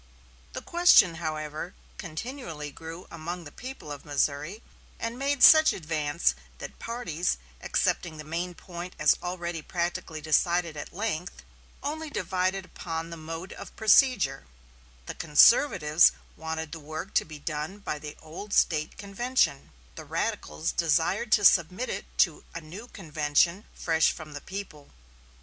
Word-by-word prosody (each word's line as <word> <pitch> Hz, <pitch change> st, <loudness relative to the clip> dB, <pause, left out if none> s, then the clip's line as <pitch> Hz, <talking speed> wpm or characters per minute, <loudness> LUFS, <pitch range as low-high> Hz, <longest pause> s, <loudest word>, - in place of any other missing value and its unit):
The -, -, -6 dB
question, 345 Hz, -, +6 dB
however, 155 Hz, +1 st, -4 dB, 0.2 s
continually 165 Hz, -, -6 dB
grew 165 Hz, +4 st, -9 dB
among 170 Hz, +2 st, -5 dB
the 145 Hz, -, -11 dB
people 255 Hz, -, -9 dB
of 145 Hz, -, -7 dB
Missouri, 145 Hz, +7 st, -1 dB, 0.4 s
and 230 Hz, +1 st, -3 dB
made 280 Hz, 0 st, +1 dB
such 315 Hz, 0 st, +9 dB
advance 150 Hz, -, 0 dB, 0.2 s
that -, -, -9 dB
parties, 230 Hz, -, -2 dB, 0.2 s
accepting 160 Hz, -3 st, 0 dB
the 155 Hz, -, -7 dB
main 170 Hz, +3 st, -4 dB
point 175 Hz, +1 st, -8 dB
as -, -, +4 dB
already 175 Hz, -2 st, -4 dB
practically 170 Hz, -1 st, -3 dB
decided 165 Hz, +2 st, +1 dB
at 145 Hz, -, -7 dB
length 185 Hz, -3 st, -4 dB, 0.4 s
only 315 Hz, +2 st, -3 dB
divided 185 Hz, -4 st, -1 dB
upon 165 Hz, -2 st, -5 dB
the -, -, -5 dB
mode 165 Hz, +3 st, -7 dB
of -, -, -10 dB
procedure 215 Hz, -, +4 dB, 0.6 s
The -, -, -5 dB
conservatives 160 Hz, -, +5 dB, 0.2 s
wanted 160 Hz, -1 st, -5 dB
the 165 Hz, -, -6 dB
work 155 Hz, +1 st, -7 dB
to -, -, +3 dB
be 155 Hz, -1 st, -10 dB
done 155 Hz, +5 st, -4 dB
by 150 Hz, -7 st, -4 dB
the 150 Hz, 0 st, -8 dB
old 190 Hz, +6 st, -6 dB
State 155 Hz, -2 st, +2 dB
convention, 240 Hz, +6 st, 0 dB, 0.2 s
the -, -, -9 dB
radicals -, -, -2 dB
desired 470 Hz, -, +1 dB
to -, -, +4 dB
submit -, -, +4 dB
it -, -, -4 dB, 0.2 s
to -, -, -13 dB
a -, -, -3 dB
new 185 Hz, +10 st, -10 dB
convention 165 Hz, +1 st, 0 dB
fresh 165 Hz, -1 st, +2 dB
from 155 Hz, -1 st, -9 dB
the 145 Hz, -, -7 dB
people. 190 Hz, -7 st, -8 dB
170 Hz, 140 wpm, -28 LUFS, 155-200 Hz, 0.6 s, such